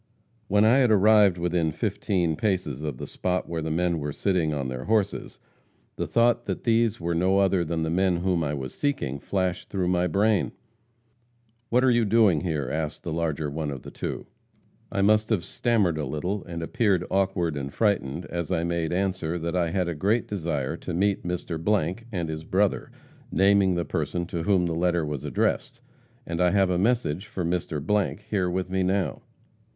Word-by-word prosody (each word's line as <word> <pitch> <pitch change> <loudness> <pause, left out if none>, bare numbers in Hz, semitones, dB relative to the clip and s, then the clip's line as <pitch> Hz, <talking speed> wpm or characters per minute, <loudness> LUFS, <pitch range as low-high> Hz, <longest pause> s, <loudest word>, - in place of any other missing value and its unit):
"When 105 +2 +4
I 115 +4 +5
had 125 -3 +4
arrived 105 -2 +5
within 85 -2 0
fifteen 85 +1 -1
paces 90 - -1
of 75 -5 -4
the - - -6
spot 90 0 -2
where 85 -1 -3
the 80 - -3
men 85 +1 0
were 75 0 -3
sitting 90 -1 0
on 70 -3 -2
their 65 0 -5
horses, 105 -2 0 0.6
the - - -3
thought 120 0 +2
that - - -4
these 115 -2 +2
were 85 0 -1
no 95 +3 +2
other 95 -2 +3
than 80 0 -2
the 80 - -1
men 90 0 +2
whom 90 -1 0
I 75 0 -1
was 65 -2 -5
seeking, 70 - -2
flashed 95 +2 -2
through 95 -3 -1
my 90 0 +2
brain. 100 +3 +1 1.2
"'What 125 +2 +3
are 130 - +5
you 120 -1 +3
doing 105 -7 +4
here?' 80 -7 -2
asked 75 -1 -3
the 85 - -3
larger 80 -2 -1
one 75 0 -3
of 70 -3 -6
the - - -9
two. - - -5 0.7
"I 100 - 0
must 110 +1 +3
have 95 -7 0
stammered 100 -7 +1
a 75 - -1
little, 90 +9 -3
and 85 -2 -5
appeared 100 -2 +1
awkward 95 -4 +1
and 70 -1 -4
frightened 90 -7 0
as 85 +1 -4
I 85 -2 +1
made 85 -2 -1
answer 90 -2 -1
that 85 +1 -3
I 85 -2 +1
had 90 +1 0
a 85 - -1
great 105 +9 0
desire 80 -9 -2
to - - -5
meet 100 +2 +1
Mr. 90 +3 -1
and 85 -5 -2
his 80 0 -5
brother 95 +4 0 0.4
naming 95 -1 +4
the 85 - -1
person 85 -1 -2
to 85 -1 -4
whom 90 0 +2
the 85 - -1
letter 85 -1 +1
was 75 -3 -4
addressed - - -1 0.5
and 85 +1 -2
I 90 - +5
have 95 -1 +2
a 90 - +1
message 105 -5 0
for 90 - -4
Mr. 90 +4 -1
here 95 -4 +1
with 95 +1 -2
me 95 0 +1
now. 95 +1 0
90 Hz, 190 wpm, -26 LUFS, 80-100 Hz, 1.2 s, I